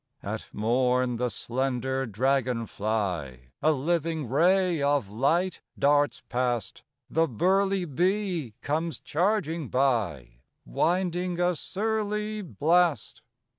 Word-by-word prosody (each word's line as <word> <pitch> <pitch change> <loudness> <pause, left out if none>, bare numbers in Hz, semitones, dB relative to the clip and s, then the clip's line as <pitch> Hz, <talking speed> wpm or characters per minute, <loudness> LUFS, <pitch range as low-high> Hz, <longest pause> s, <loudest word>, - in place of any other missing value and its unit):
At - - -5
morn 125 +2 +1
the 125 +1 0
slender 130 +3 -2
dragon 125 +1 0
fly, 90 - -3
A 155 - +4
living 160 0 -1
ray 175 +4 +3
of 140 -8 +1
light, 165 - +1 0.2
darts 145 +1 +2
past; 120 -4 -2 0.3
The 165 0 +2
burly 190 - +1
bee 175 - -1
comes 160 +3 -1
charging 170 -3 0
by 100 - 0 0.3
Winding 175 - 0
a 175 0 +2
surly 210 +3 -2
blast. 170 - +1
145 Hz, 100 wpm, -27 LUFS, 120-175 Hz, 0.3 s, A